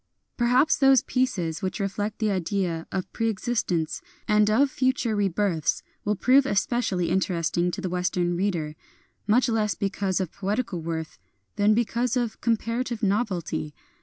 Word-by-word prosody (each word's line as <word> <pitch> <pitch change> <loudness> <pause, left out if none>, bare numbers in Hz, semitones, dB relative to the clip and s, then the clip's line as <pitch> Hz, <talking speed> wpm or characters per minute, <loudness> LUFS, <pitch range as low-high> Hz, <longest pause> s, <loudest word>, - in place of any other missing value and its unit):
Perhaps 250 +6 +3
those 270 -2 +5
pieces 195 -10 -1
which 190 +2 -3
reflect 205 +2 -2
the 215 -2 0
ideas 180 -3 -1
of 190 -1 -4
preexistence 215 -7 -1 0.3
and 210 -1 +4
of 265 +6 +3
future 255 -4 0
rebirths 195 -4 0 0.2
will 210 +1 0
prove 265 +6 +4
especially 200 -5 0
interesting 175 -2 +1
to 190 +2 -4
the 190 - -2
Western 180 -1 0
reader, 170 -5 -1 0.3
— - - -38
much 240 +5 +4
less 215 -3 +1
because 195 -1 -1
of 185 -4 -2
poetical 200 -2 -2
worth 160 -1 -5 0.4
than 210 0 +4
because 235 +2 0
of 240 -3 -2
comparative 230 +1 -1
novelty. 185 -7 -1
205 Hz, 140 wpm, -25 LUFS, 180-235 Hz, 0.4 s, those